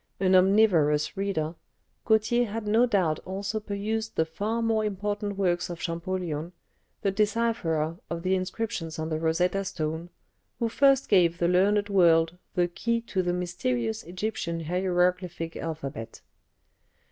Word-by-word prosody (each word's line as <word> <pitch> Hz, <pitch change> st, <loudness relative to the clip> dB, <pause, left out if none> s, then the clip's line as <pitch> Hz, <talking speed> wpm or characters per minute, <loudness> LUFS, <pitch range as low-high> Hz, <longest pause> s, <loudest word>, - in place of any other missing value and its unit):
An 190 Hz, 0 st, +3 dB
omnivorous 185 Hz, -6 st, +4 dB
reader, 190 Hz, -5 st, -1 dB, 0.5 s
Gautier 225 Hz, +2 st, +3 dB
had 215 Hz, +1 st, -4 dB
no 225 Hz, +4 st, +4 dB
doubt 180 Hz, -9 st, +1 dB
also 200 Hz, +3 st, -4 dB
perused 215 Hz, +2 st, -3 dB
the 160 Hz, -, +2 dB
far 215 Hz, +8 st, -2 dB
more 225 Hz, -1 st, +1 dB
important 205 Hz, 0 st, -2 dB
works 180 Hz, -3 st, 0 dB
of 170 Hz, -1 st, -6 dB
Champollion, 170 Hz, -1 st, -3 dB, 0.5 s
the 195 Hz, -, +2 dB
decipherer 200 Hz, -7 st, 0 dB
of 170 Hz, 0 st, -4 dB
the 185 Hz, 0 st, +1 dB
inscriptions 185 Hz, -3 st, -3 dB
on 160 Hz, 0 st, -3 dB
the 155 Hz, -1 st, -1 dB
Rosetta 180 Hz, +4 st, +1 dB
stone, 160 Hz, -1 st, -4 dB, 0.5 s
who 230 Hz, -2 st, 0 dB
first 275 Hz, +2 st, +4 dB
gave 175 Hz, -4 st, +4 dB
the 175 Hz, -, +1 dB
learned 200 Hz, +3 st, +3 dB
world 170 Hz, -3 st, +4 dB, 0.2 s
the 175 Hz, -1 st, +3 dB
key 230 Hz, +7 st, -1 dB
to 205 Hz, -5 st, -1 dB
the 175 Hz, -1 st, 0 dB
mysterious 130 Hz, -11 st, -2 dB
Egyptian 175 Hz, -2 st, -3 dB
hieroglyphic 180 Hz, -1 st, 0 dB
alphabet. 140 Hz, -8 st, -6 dB
185 Hz, 135 wpm, -27 LUFS, 165-210 Hz, 0.5 s, omnivorous